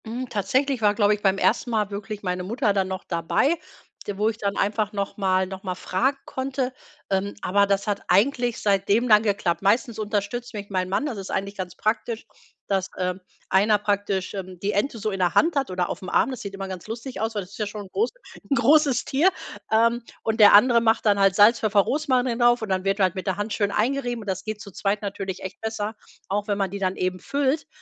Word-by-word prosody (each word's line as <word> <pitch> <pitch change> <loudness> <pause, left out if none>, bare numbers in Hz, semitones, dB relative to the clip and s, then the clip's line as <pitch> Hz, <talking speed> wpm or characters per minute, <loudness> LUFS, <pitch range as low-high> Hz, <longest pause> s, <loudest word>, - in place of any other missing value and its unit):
Hm, 240 +3 -5
tatsächlich 260 +4 0
war, 210 -1 +3
glaube 205 -1 +4
ich, 210 - -4
beim 195 -1 +2
ersten 235 +4 +1
Mal 215 -3 0
wirklich 205 +1 -6
meine 180 -1 -2
Mutter 210 +1 0
dann 195 -1 +1
noch 190 0 -5
dabei, 170 - +1 0.5
d 205 -2 -4
wo 210 +2 +2
ich 220 - -5
dann 200 -1 -2
einfach 210 +1 0
nochmal 195 -2 0
nochmal 190 0 -5
fragen 255 +10 0
konnte. 260 -1 -3 0.4
Ähm, 195 +1 0
aber 200 +2 +3
das 200 0 +1
hat 205 -2 -1
eigentlich 240 +4 +2
seitdem 200 +4 +2
dann 210 -2 +7
geklappt. 200 -5 0
Meistens 220 +3 +1
unterstützt 215 +3 -3
mich 205 0 -7
mein 185 -1 -1
Mann. 200 +9 0
Das 245 -9 -4
ist 195 - -7
eigentlich 200 +1 -3
ganz 185 -2 -6
praktisch, 225 +1 -2 0.4
dass, 195 -1 0
ähm, 180 0 -2 0.3
einer 210 +3 +4
praktisch, 200 -2 -1
ähm, 185 -2 -6
die 200 +3 -1
Ente 220 +5 -1
so 215 0 -2
in 195 - -4
der 180 -2 +1
Hand 325 0 +4
hat 275 -1 0
oder 180 -1 -1
aufm 185 - -6
Arm. 270 - +2
Das 255 - -6
sieht 200 -1 -6
immer 195 0 -5
ganz 185 -1 -7
lustig 230 0 -6
aus, 225 0 -2
weil 205 - -1
das 180 - -16
ist - - -12
ja 210 - -1
schon 205 -1 -7
groß 445 +3 +1 0.4
'n 280 - +3
großes 280 +2 +4
Tier. 300 +8 +3 0.4
Ähm, 230 +2 +3 0.2
und 220 +1 -1
der 205 -1 +8
andere 235 +2 +6
macht 225 0 +2
dann 205 -1 +4
halt 195 -2 +4
Salz, 215 +3 +6
Pfeffer, 210 -2 +3
Rosmarin 255 -2 0
drauf 240 -1 +4
und 220 - -4
dann 185 -1 0
wird 195 +1 +1
halt 185 -3 +3
mit 185 +1 -6
der 190 0 0
Hand 205 +1 -3
schön 205 -2 +1
eingerieben 245 +1 -1
und 210 - -11
das 185 - -3
geht 215 -1 -5
zu 205 -3 -10
zweit 200 +3 -1
natürlich 195 -1 -5
echt 190 - -7
besser, 220 -1 -3 0.3
auch 205 +2 -2
wenn 205 -1 0
man 195 -2 -1
die 200 - -5
dann 190 -1 0
eben 185 0 -2
füllt. 285 - -1
205 Hz, 230 wpm, -24 LUFS, 195-230 Hz, 0.5 s, der